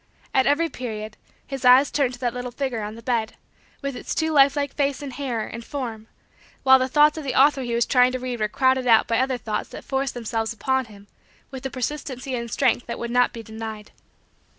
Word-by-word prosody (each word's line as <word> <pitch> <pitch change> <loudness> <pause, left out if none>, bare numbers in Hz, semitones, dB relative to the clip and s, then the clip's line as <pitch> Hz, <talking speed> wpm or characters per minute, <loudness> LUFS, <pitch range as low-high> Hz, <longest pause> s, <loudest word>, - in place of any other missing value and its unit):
At 265 - +3
every 300 +4 +3
period, 215 -6 -6 0.3
his 270 -1 -6
eyes 255 +3 +6
turned 260 -4 0
to - - -18
that 240 -2 0
little 250 0 -4
figure 245 -2 -3
on 210 +1 -5
the 230 - -12
bed, 230 -2 -1 0.5
with 275 -1 -3
its - - -5
too 320 0 0
lifelike 285 0 +3
face 285 0 -1
and 275 -2 -6
hair 245 -6 -3
and 230 +1 -8
form 230 -5 -6 0.6
while 265 0 +7
the 255 - +1
thoughts 300 +3 +4
of - - -7
the 265 -2 0
author 280 0 +5
he 240 -2 -2
was 235 - +2
trying 250 -1 +4
to - - 0
read 250 -2 -4
were 215 - +1
crowded 260 +2 +1
out 225 -2 +6
by 230 0 +1
other 260 0 +1
thoughts 220 -2 -4
that - - -10
forced 270 0 -2
themselves 225 -1 -2
upon 265 +3 0
him 205 -2 -15 0.5
with 265 0 -5
a - - -8
persistency 265 0 -4
and 235 -1 -3
strength 240 - +1
that 235 - -4
would 235 0 -4
not 245 0 +3
be 230 - -8
denied. 220 -1 -8
250 Hz, 220 wpm, -23 LUFS, 230-270 Hz, 0.6 s, while